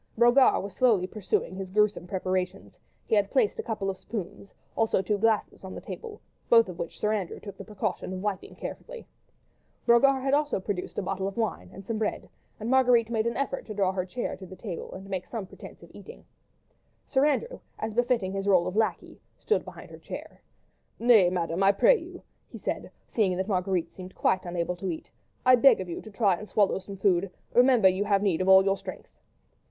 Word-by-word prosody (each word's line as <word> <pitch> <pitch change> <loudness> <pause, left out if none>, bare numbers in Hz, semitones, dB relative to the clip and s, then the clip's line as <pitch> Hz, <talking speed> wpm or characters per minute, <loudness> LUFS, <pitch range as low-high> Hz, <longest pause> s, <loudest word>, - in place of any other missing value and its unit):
Brogard 240 +1 +5
was 200 -1 -7
slowly 225 -8 +3
pursuing 190 -2 -2
his 190 0 -6
gruesome 210 -2 +1
preparations; 185 0 -3 0.3
he - - -3
had 205 -2 +3
placed 245 -6 +1
a - - +1
couple 210 -4 -3
of 195 -1 -2
spoons, 200 -2 -7 0.2
also 225 -3 +2
two 205 +2 -1
glasses 220 -2 0
on 190 - -8
the - - -5
table, 450 -2 -8 0.3
both 230 -2 +6
of 180 -2 -9
which 170 - -6
Sir 210 0 +1
Andrew 195 -5 -3
took 200 - -9
the - - -9
precaution 205 -3 -4
of 185 - -4
wiping 205 -3 -4
carefully. - - -8 0.8
Brogard 260 +3 +4
had 270 0 0
also 295 -5 +1
produced 190 -1 -4
a - - -1
bottle 190 +1 -2
of 195 - -6
wine 225 -3 -2
and 195 - -11
some 220 0 -3
bread, 215 - -2 0.3
and 220 - -5
Marguerite 245 -3 +4
made 225 0 +1
an 235 - -2
effort 275 0 -2
to 215 - -6
draw 195 -2 +2
her 185 -1 -2
chair 215 +7 -4
to 190 - -10
the 185 - -10
table 185 -4 -7
and 190 - -8
to 195 - -12
make 185 -2 -3
some 225 -5 -5
pretence - - -13
at - - -16
eating. - - -12 0.8
Sir 270 -1 +1
Andrew, 470 - -1 0.2
as 220 0 -4
befitting 235 -5 +1
his 195 0 -3
rôle 185 -3 +4
of 185 - -4
lacquey, 220 0 -1 0.2
stood 445 - 0
behind - - -11
her - - -11
chair. - - -9 0.6
"Nay, 225 -6 +5
Madame, 170 0 -2
I 195 +1 +5
pray - - +5
you," - - -11 0.3
he - - -9
said, - - -4 0.2
seeing 190 -5 0
that 190 +1 -2
Marguerite 185 -3 -1
seemed 185 0 -10
quite 185 0 +1
unable 175 0 -2
to 190 +1 -4
eat, 160 - -6 0.3
"I 255 0 +8
beg 270 +3 +6
of 185 - -4
you 170 - -5
to 220 - -11
try 200 -3 +2
and 210 - -10
swallow 205 -2 +2
some 195 +1 -9
food—remember 195 +5 +3
you 190 +2 +2
have 200 -1 +2
need 185 -4 +1
of 185 - +1
all 190 0 +8
your 195 0 +2
strength." 195 -1 -9
200 Hz, 210 wpm, -27 LUFS, 185-230 Hz, 0.8 s, I